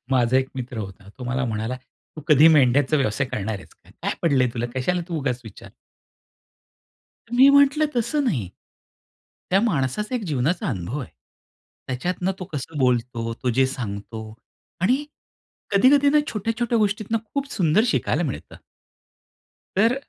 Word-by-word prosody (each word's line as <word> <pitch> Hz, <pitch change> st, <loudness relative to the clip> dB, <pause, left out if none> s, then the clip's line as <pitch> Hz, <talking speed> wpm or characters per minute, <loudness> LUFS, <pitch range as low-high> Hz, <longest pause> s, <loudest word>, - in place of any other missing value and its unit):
माझा 125 Hz, -1 st, +3 dB
एक 130 Hz, 0 st, -1 dB
मित्र 125 Hz, -2 st, -5 dB
होता. 100 Hz, -1 st, -8 dB
तो 125 Hz, -, -6 dB
मला 130 Hz, +2 st, -1 dB
म्हणाला, 110 Hz, +1 st, -3 dB, 0.4 s
तू -, -, -6 dB
कधी 150 Hz, +1 st, +7 dB
मेंढ्याचा 145 Hz, -1 st, +4 dB
व्यवसाय 135 Hz, -2 st, 0 dB
करणार 110 Hz, -3 st, -3 dB
आहेस -, -, -16 dB
का? -, -, -23 dB
काय -, -, -1 dB
पडलंय 135 Hz, -6 st, +3 dB
तुला? 120 Hz, 0 st, -2 dB
कशाला 175 Hz, +8 st, 0 dB
तू 170 Hz, -, -3 dB
उगाच 125 Hz, -3 st, -2 dB
विचार 110 Hz, -, -12 dB, 1.6 s
मी 260 Hz, +3 st, +7 dB
म्हटलं 280 Hz, +2 st, +5 dB
तसं 240 Hz, +6 st, +1 dB
नाही. 125 Hz, -, -1 dB, 1.0 s
त्या 190 Hz, +2 st, +4 dB
माणसाचा 210 Hz, -, -1 dB
एक 245 Hz, -, -1 dB
जीवनाचा 160 Hz, -, 0 dB
अनुभव 100 Hz, +4 st, -3 dB
आहे. 130 Hz, -, -8 dB, 0.8 s
त्याच्यातनं 180 Hz, +8 st, -2 dB
तो 185 Hz, -, -5 dB
कसं 150 Hz, +2 st, -5 dB
बोलतो, 120 Hz, -3 st, 0 dB
तो 125 Hz, +2 st, -2 dB
जे 130 Hz, +3 st, +3 dB
सांगतो 110 Hz, -3 st, -6 dB, 0.5 s
आणि 255 Hz, +10 st, +2 dB, 0.7 s
कधी-कधी 275 Hz, +8 st, +5 dB
ना 300 Hz, -, +5 dB
छोट्या-छोट्या 230 Hz, +2 st, -1 dB
गोष्टीतून 215 Hz, +1 st, 0 dB
खूप 280 Hz, 0 st, -3 dB
सुंदर 180 Hz, +2 st, +3 dB
शिकायला -, -, +1 dB
मिळतं. -, -, -6 dB, 1.2 s
तर 225 Hz, +5 st, +4 dB
140 Hz, 145 wpm, -23 LUFS, -, 1.6 s, कधी